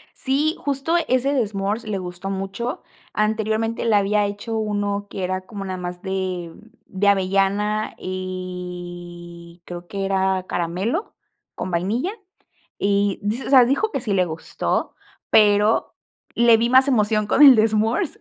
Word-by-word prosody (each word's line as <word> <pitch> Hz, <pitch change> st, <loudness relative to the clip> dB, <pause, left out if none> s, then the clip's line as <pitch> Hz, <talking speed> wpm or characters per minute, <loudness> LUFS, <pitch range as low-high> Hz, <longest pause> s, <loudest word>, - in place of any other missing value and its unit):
Sí, 290 Hz, +5 st, 0 dB
justo 285 Hz, +4 st, -1 dB
ese 255 Hz, +2 st, +1 dB
de 255 Hz, -5 st, +2 dB
S'mores 200 Hz, +3 st, -3 dB
le 210 Hz, -2 st, -2 dB
gustó 180 Hz, +1 st, -6 dB
mucho, 195 Hz, -, -4 dB, 0.3 s
anteriormente 220 Hz, +1 st, 0 dB
le 225 Hz, -2 st, +3 dB
había 205 Hz, +1 st, +2 dB
hecho 205 Hz, +3 st, -4 dB
uno 205 Hz, -1 st, -2 dB
que 190 Hz, -, -5 dB
era 185 Hz, +1 st, -2 dB
como 200 Hz, -1 st, -7 dB
nada 185 Hz, -1 st, -4 dB
más 180 Hz, 0 st, -6 dB
de 185 Hz, -3 st, -3 dB, 0.4 s
de 200 Hz, 0 st, 0 dB
avellana 200 Hz, +2 st, +1 dB
y 175 Hz, -2 st, -7 dB
creo 175 Hz, 0 st, -8 dB
que 195 Hz, +1 st, -3 dB
era 190 Hz, -1 st, 0 dB
caramelo 180 Hz, -, -2 dB, 0.4 s
con -, -, -5 dB
vainilla 210 Hz, -, -1 dB, 0.7 s
y 200 Hz, 0 st, +1 dB
di 215 Hz, +5 st, -1 dB
o -, -, -6 dB
sea, 260 Hz, -3 st, +7 dB
dijo 280 Hz, -, 0 dB
que -, -, -2 dB
sí 215 Hz, -4 st, -2 dB
le 185 Hz, -2 st, +3 dB
gustó, 160 Hz, -1 st, -3 dB, 0.3 s
pero 210 Hz, +1 st, +4 dB, 0.4 s
le 235 Hz, -1 st, +6 dB
vi 235 Hz, +1 st, +1 dB
más 260 Hz, +2 st, +5 dB
emoción 215 Hz, -4 st, +2 dB
con 270 Hz, -, +2 dB
el 275 Hz, -3 st, +10 dB
de 220 Hz, 0 st, +4 dB
S'mores, 225 Hz, -, 0 dB
205 Hz, 150 wpm, -22 LUFS, 185-225 Hz, 0.7 s, el